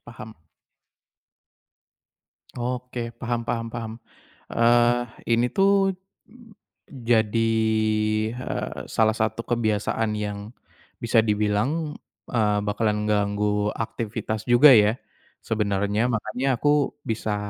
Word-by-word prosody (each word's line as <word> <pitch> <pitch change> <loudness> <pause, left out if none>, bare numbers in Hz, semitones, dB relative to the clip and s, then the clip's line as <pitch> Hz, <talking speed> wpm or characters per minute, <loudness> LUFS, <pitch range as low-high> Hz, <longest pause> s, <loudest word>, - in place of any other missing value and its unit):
paham. 110 -2 -11 2.2
Oke, 125 -1 -4
paham 120 -1 -3
paham 115 -1 -2
paham. 115 -2 -5 0.6
Eee, 120 +1 +3 0.2
ini 120 +2 +3
tuh 195 +1 +2 0.9
jadi, 115 -3 +1 0.8
eee, 125 - -5
salah 110 0 +2
satu 110 +1 -1
kebiasaan 110 -1 -1
yang 105 +1 -5 0.5
bisa 115 -1 +3
dibilang, 105 +9 0 0.3
eee, 105 -4 +1
bakalan 105 0 0
ganggu 105 0 0
aktivitas 110 -1 -4
juga 120 +5 +7
ya 105 +2 +4 0.4
sebenernya. 105 +1 0
Makanya 120 +4 -1
aku 145 -1 +2
bisa 110 -2 -2
115 Hz, 90 wpm, -24 LUFS, 105-120 Hz, 2.2 s, juga